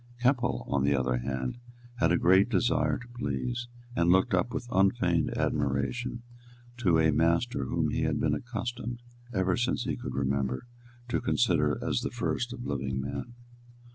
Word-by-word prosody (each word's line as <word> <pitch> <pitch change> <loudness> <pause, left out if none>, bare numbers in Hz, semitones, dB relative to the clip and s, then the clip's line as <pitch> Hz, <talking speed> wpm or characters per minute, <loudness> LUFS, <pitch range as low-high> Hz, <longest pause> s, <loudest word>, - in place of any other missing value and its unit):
Keppel, 125 0 +1
on 70 -1 +1
the 70 0 +3
other 65 -1 +1
hand, 65 - -3 0.4
had 80 -8 +3
a 85 - +4
great 95 +5 +5
desire 100 -6 +2
to 120 - -11
please, 120 - -3 0.3
and 85 0 +2
looked 95 +1 +3
up 95 +7 +2
with 125 -1 -4
unfeigned 95 -4 +2
admiration 75 - -1 0.5
to 90 -9 +3
a 80 -1 +4
master 85 - +1
whom - - 0
he - - -1
had - - 0
been - - +2
accustomed, 120 0 -4 0.3
ever 95 -4 +1
since 120 +1 0
he - - -1
could 125 0 -6
remember, 70 - -1 0.4
to 120 - 0
consider - - +2
as - - +1
the - - -2
first 120 0 -2
of 125 -1 -7
living 65 -1 -2
men. 70 - -5
95 Hz, 165 wpm, -29 LUFS, -, 0.5 s, great